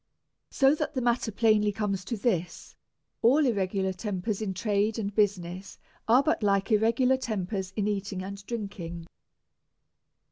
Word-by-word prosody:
So 270 +1 +4
that 305 -1 -3
the 260 - 0
matter 240 -1 +1
plainly 210 -1 +3
comes 200 -2 -2
to 230 - -3
this; 185 -6 -2 0.5
all 275 +7 +5
irregu 195 -6 0
lar 190 0 0
tempers 200 +1 -3
in 210 -3 -2
trade 210 +2 0
and 205 -2 -3
business 195 -3 -1 0.3
are 245 +4 +5
but 315 - +1
like 200 0 +1
irregu 225 +3 +3
lar 260 0 +4
tem.pers 195 -5 -3
in 205 -2 0
eating 200 -2 -3
and 200 +1 -7
drinking. 190 -7 -5
205 Hz, 150 wpm, -28 LUFS, 195-230 Hz, 0.5 s, all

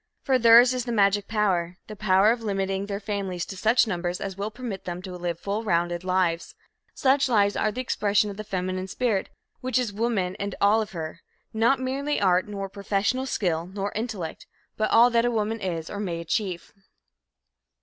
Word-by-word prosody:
For 260 -2 +2
theirs 235 +2 +7
is 250 -1 -2
the 240 - -3
magic 200 -2 +2
power 185 -5 0
the 215 - -9
power 200 0 +4
of 235 0 -2
limiting 195 -2 -2
their 200 -1 -3
families 195 -4 -3
to 195 - -8
such 225 +6 +3
numbers 175 -3 -2
as 195 -1 -5
will 200 +2 -3
permit 220 -4 -7
them 175 -1 -4
to 185 -2 -7
live 175 -1 -3
full 205 +3 -3
rounded 175 -3 0
lives. 180 -2 0 0.4
Such 270 0 +3
lives 205 -4 +3
are 215 - +1
the 255 - -4
expression 210 -4 +1
of 195 - -10
the 215 - -5
feminine 185 -1 -3
spirit 215 -1 -1 0.3
which 255 -1 -1
is 245 -5 -1
woman 205 -4 -1
and 200 -1 -3
all 210 +2 +4
of 215 -2 -6
her 160 -1 -6 0.3
not 230 +5 +3
merely 275 +3 -1
art, 185 -1 +3
nor 200 -1 -4
professional 200 +6 -1
skill, 170 -8 -1
nor 195 +1 -4
intellect 210 -7 -5 0.3
but 215 - 0
all 240 +2 +6
that 235 +1 +2
woman 220 0 -1
is, 165 -4 -3
or 205 - -6
may 175 -5 -3
achieve. 175 +1 -3
200 Hz, 190 wpm, -25 LUFS, 185-225 Hz, 0.4 s, theirs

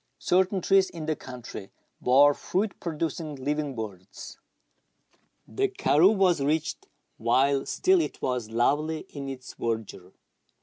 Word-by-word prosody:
II, - - -48
■ - - -42
^ - - -17
certain 185 +1 +2
trees 195 +1 +3
in 165 -3 -7
the 155 0 0
country 125 -7 -9 0.3
bore 140 +3 +6
fruit 195 +8 -2
producing 160 -2 -3
livinjj 145 +1 -2
birds. 100 -4 -8 1.1
The 405 +1 0
karroo 220 - +3
was 180 -6 +3
reached 155 +3 -1 0.3
while 135 +4 +2
still 370 -1 +3
it - - -4
was 125 -4 -2
lovely 145 +7 +1
in 140 -2 -6
its 130 -1 -8
verdure. 110 -5 -4
145 Hz, 140 wpm, -27 LUFS, 125-175 Hz, 1.1 s, bore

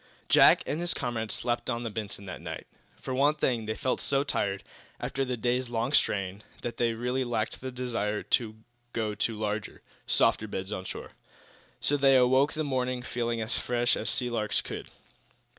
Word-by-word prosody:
Jack - - +7
and 155 - -2
his 175 0 -1
comrades 115 -5 -2
slept 120 0 -1
on 120 -1 -1
the 115 - -3
"Benson" 100 -1 -5
that 95 - -7
night. - - -6 0.3
For 130 - -4
one 145 +3 +4
thing, 120 -7 0
they 110 - -1
felt 130 - -1
so 140 0 +3
tired, 100 -8 -1 0.4
after 135 - -1
the 125 -2 -2
day's 125 +2 0
long 120 +3 -1
strain, 100 -5 +1 0.2
that 120 -1 -4
they 115 -1 +2
really 125 +3 0
lacked 115 -3 -2
the 130 - -4
desire 115 -5 -2
even - - -16
to 110 -3 +2 0.4
go 110 -2 -1
to 110 +1 -1
larger, 105 -1 -3 0.2
softer 110 - +3
beds 95 -1 -4
on 95 -3 -4
shore. - - -6 0.7
So 145 - +2
they 135 -1 +5
awoke 130 +4 +4
in - - -5
the - - +2
morning 130 -3 -1
feeling 120 -2 -1
as 110 +2 -1
fresh 120 0 +2
as - - -1
sea 125 -1 0
larks 110 -2 0
should. - - -6
120 Hz, 190 wpm, -29 LUFS, 110-130 Hz, 0.7 s, Jack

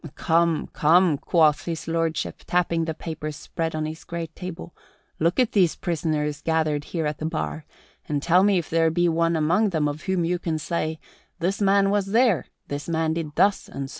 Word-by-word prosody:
"Come, 165 -1 +2
come," 165 -1 +4
quoth 150 -4 +3
His 165 -2 -4
Lordship, 165 -1 -2
tapping 170 -2 +1
the 160 -1 -3
papers 155 -2 -6
spread 160 +1 -4
on 155 0 -1
his 155 +1 -6
great 165 -2 -6
table, 180 -2 -7 0.5
"look 170 +6 +1
at 250 -3 +3
these 185 -6 +3
prisoners 155 -3 -2
gathered 155 -3 0
here 165 -3 -3
at 150 0 -3
the 155 - -3
bar 160 -1 -4 0.4
and 145 -1 0
tell 175 +5 +4
me 200 -1 +4
if 170 - -2
there 165 0 +2
be 175 +2 +1
one 165 0 +1
among 170 +7 +2
them 160 -5 0
of 145 +1 -4
whom 190 -3 0
you 175 +1 0
can 165 -2 -2
say, 160 0 -3 0.4
'This 185 +4 -1
man 195 0 +4
was 205 -1 +1
there; 220 - +2 0.2
this 145 +3 -5
man 160 -1 0
did 160 -2 -4
thus 200 0 +2
and 135 0 -5
so.'" - - -15
165 Hz, 195 wpm, -24 LUFS, 155-175 Hz, 0.5 s, come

